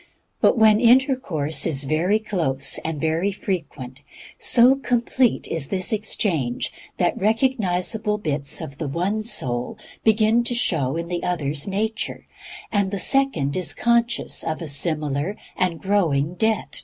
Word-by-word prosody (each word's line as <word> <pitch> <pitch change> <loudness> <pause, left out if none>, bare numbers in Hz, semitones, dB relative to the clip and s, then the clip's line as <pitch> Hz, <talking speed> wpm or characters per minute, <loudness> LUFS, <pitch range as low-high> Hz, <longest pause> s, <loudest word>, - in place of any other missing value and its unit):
And 240 - +4
when 215 -1 +6
intercourse 230 - +2
is 145 -4 +1
very 165 +9 +1
close 160 -11 -1
and 160 -2 -3
very 160 +5 0
frequent, 150 - -5 0.4
so 245 +2 +6
complete 250 -2 0
is 155 -4 -2
this 185 +5 -1
exchange 175 - -1 0.2
that - - 0
recognizable 215 -2 0
bits 145 -8 -1
of 140 +1 -8
the 155 - -3
one 180 +9 -1
soul 125 - -2 0.3
begin 220 +2 +3
to 245 - -2
show 155 - 0
in 170 0 -4
the 175 0 -3
other's 150 -4 -2
nature, 215 +3 -3 0.5
and 200 -2 +1
the 200 - -3
second 190 - +1
is 185 -3 0
conscious 235 0 +1
of 155 -1 -3
a 165 - -6
similar 150 +4 -1 0.2
and 180 -3 -1
growing 170 -6 +1
debt - - -18
to 220 - +3
the 220 -1 -1
first. - - -7
185 Hz, 150 wpm, -22 LUFS, 150-220 Hz, 0.5 s, when